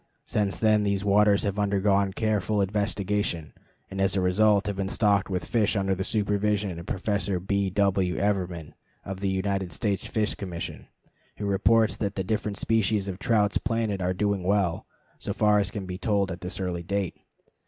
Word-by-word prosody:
Since 100 -2 -1
then 110 -1 +3
these 100 -1 0
waters 105 0 +4
have 100 0 -1
undergone 100 -1 +2
careful 105 0 0
investigation, 100 -4 -1 0.4
and, 95 0 -3
as 95 0 +2
a - - +2
result, 100 +2 +3
have 105 - -2
been 95 -1 -2
stocked 100 -3 +2
with 90 -2 -2
fish 110 -2 +1
under 95 -1 +1
the 95 0 -2
supervision 105 -3 0
of 85 - -10
Professor 100 -1 -1
B. 100 +1 0
W. 95 -2 +1
Evermann, 90 -6 -1 0.3
of 95 -1 -5
the 100 0 -1
United 95 -1 -1
States 100 -1 -2
Fish 110 -1 0
Commission, 90 -4 -6 0.5
who 105 - -4
reports 110 +3 +3
that 100 -2 -2
the 95 - -1
different 105 +1 -2
species 110 -3 +1
of 95 -1 -5
trout 105 -5 +2
planted 115 -4 -1
are 90 0 0
doing 100 0 0
well, 95 -2 0 0.3
so - - -3
far 105 -1 +3
as 100 -1 0
can 100 -3 -5
be 90 0 -6
told 100 0 +1
at 85 - -7
this 90 +1 -5
early 90 -2 -2
date. 100 +1 -2
100 Hz, 180 wpm, -26 LUFS, 95-105 Hz, 0.5 s, waters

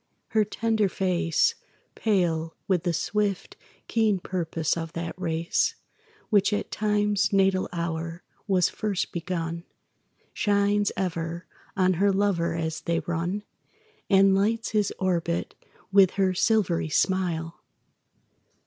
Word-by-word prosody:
Her 220 -1 +3
tender 220 -1 0
face, 185 - +1 0.4
Pale 170 -6 0
with 180 -2 +1
the 175 - +2
swift, 200 +4 -1 0.3
keen 220 -3 +2
purpose 165 -3 -2
of 165 -1 -5
that 170 0 -4
race 170 - 0 0.6
Which 205 -1 +4
at 205 - -2
Time's 210 -1 +1
natal 195 -1 +2
hour 170 0 -4 0.2
was 185 -3 +3
first 205 -4 -2
begun, 170 -1 -3 0.7
Shines 205 0 +2
ever 170 -2 -3 0.3
on 185 -1 +3
her 200 0 +5
lover 190 -4 +1
as 160 -1 -3
they 170 -1 0
run 175 +4 -2 0.7
And 195 -1 +5
lights 220 +4 +1
his 210 -2 +1
orbit 170 -2 -1 0.4
with 195 -2 +6
her 190 -2 +2
silvery 185 -5 +1
smile. 170 -1 0
185 Hz, 115 wpm, -26 LUFS, 170-205 Hz, 0.7 s, with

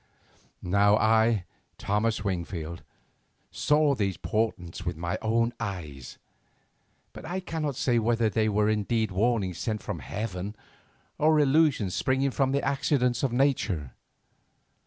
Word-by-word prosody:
Now 100 +3 +4
I, 110 -2 +3 0.3
Thomas 105 +1 0
Wingfield, 85 -3 -4 0.7
saw 150 -1 +2
these 100 -8 -1
portents 90 -4 -2
with 90 -3 -3
my 85 +1 -3
own 115 +2 +1
eyes, 85 - -6 1.0
but - - -10
I 175 +4 -3
cannot 160 -6 -3
say 120 -2 +2
whether 115 0 +2
they 110 0 +1
were 105 0 +2
indeed 110 0 0
warnings 95 -3 0
sent 110 -2 -3
from 100 -6 -4
heaven 100 - -5 0.6
or 155 0 +4
illusions 140 - +3
springing 130 +1 +1
from 135 0 +1
the 140 +1 0
accidents 135 -3 +1
of 135 - 0
nature. 115 - 0
110 Hz, 125 wpm, -27 LUFS, 95-130 Hz, 1.0 s, Now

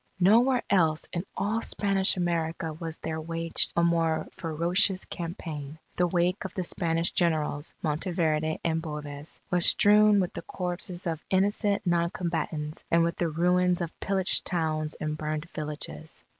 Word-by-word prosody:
Nowhere 235 +7 +4
else 160 -5 +2
in 175 +2 -3
all 220 +3 0
Spanish 195 -3 +1
America 165 -2 -1
was 165 0 -5
there 160 0 -4
waged 165 0 +1
a 170 - +3
more 165 -1 +1
ferocious 175 +3 +1
campaign. 160 -4 -6 0.2
The 180 - +2
wake 175 +2 +1
of 190 - -7
the 185 - -1
Spanish 165 -1 -1
Generals, 155 -3 0
Monteverde 160 -1 0
and 165 -1 0
Boves, 150 -2 -7
was 180 -1 +2
strewn 210 0 +6
with 180 -2 -1
the - - -5
corpses 180 0 -4
of 165 -2 -3
innocent 200 +1 +1
non 170 -1 +2
combatants 160 -3 -3
and 170 0 +4
with 170 0 -1
the 170 - 0
ruins 180 +2 +2
of 170 -2 -5
pillaged 190 -1 +1
towns 155 -3 -1
and 155 0 -3
burned 155 +1 -3
villages. 150 - -6
170 Hz, 150 wpm, -28 LUFS, 155-180 Hz, 0.2 s, strewn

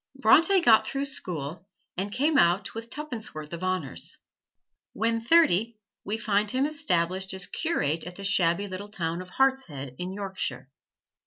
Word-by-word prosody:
Bronte 330 - +5
got 225 -9 +5
through 275 +1 -2
school 175 - -4 0.3
and 195 +3 -3
came 290 +8 +1
out 175 +1 +3
with 230 +1 -7
tuppence 255 - -6
worth 155 +1 -7
of 170 - -5
honors. 185 -8 -2 0.8
When 230 +1 0
thirty, 230 - +3 0.3
we 210 +2 -2
find 210 -2 +1
him 260 +4 +1
established 190 - 0
as 190 -1 -3
curate 165 - -1
at 180 0 -8
the 200 - -9
shabby 190 -1 +2
little 200 +2 -7
town 170 -4 -3
of 185 - -11
Hartshead, 180 - 0
in 180 +1 -3
Yorkshire. 190 -10 -4
200 Hz, 155 wpm, -27 LUFS, 175-235 Hz, 0.8 s, Bronte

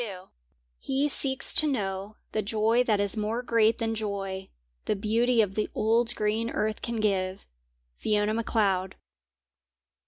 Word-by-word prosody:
XXII 190 -5 -7 0.5
He 275 +2 0
seeks 270 -2 +4
to 310 - +5
know 200 -5 -3 0.2
The 215 - -1
joy 220 +3 +1
that 215 -4 +1
is 205 +1 +2
more 220 +3 -2
great 230 -2 +2
than 225 -1 -2
joy 195 -3 -4 0.4
The - - 0
beauty 225 +3 +2
of 195 -2 -4
the 215 +1 -2
old 230 +2 +1
green 215 +2 -1
earth 215 -1 -2
can 235 -1 -3
give. 190 -3 -1 0.5
FIONA 210 0 0
MACLEOD. 200 -5 0
215 Hz, 145 wpm, -27 LUFS, 200-230 Hz, 0.5 s, to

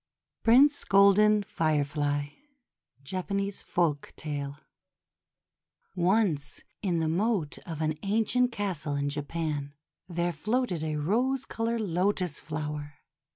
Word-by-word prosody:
PRINCE 275 +6 +5
GOLDEN 205 +2 +5
FIREFLY 145 -3 -1 0.7
Japanese 195 +5 -3
Folktale 145 -3 -2 1.4
ONCE 175 -6 +1 0.2
in 180 -4 0
the 160 -1 +1
moat 180 -1 0
of 160 -2 -3
an 155 0 +1
ancient 225 +5 +2
castle 180 -10 -2
in 140 0 0
Japan, 145 -1 -3 0.3
there 175 0 -1
floated 215 -8 -1
a 155 -1 -2
rose 245 - 0
colored 230 0 -2
Lotus 180 -3 0
Flower. 150 -1 -5
170 Hz, 100 wpm, -28 LUFS, 150-205 Hz, 1.4 s, PRINCE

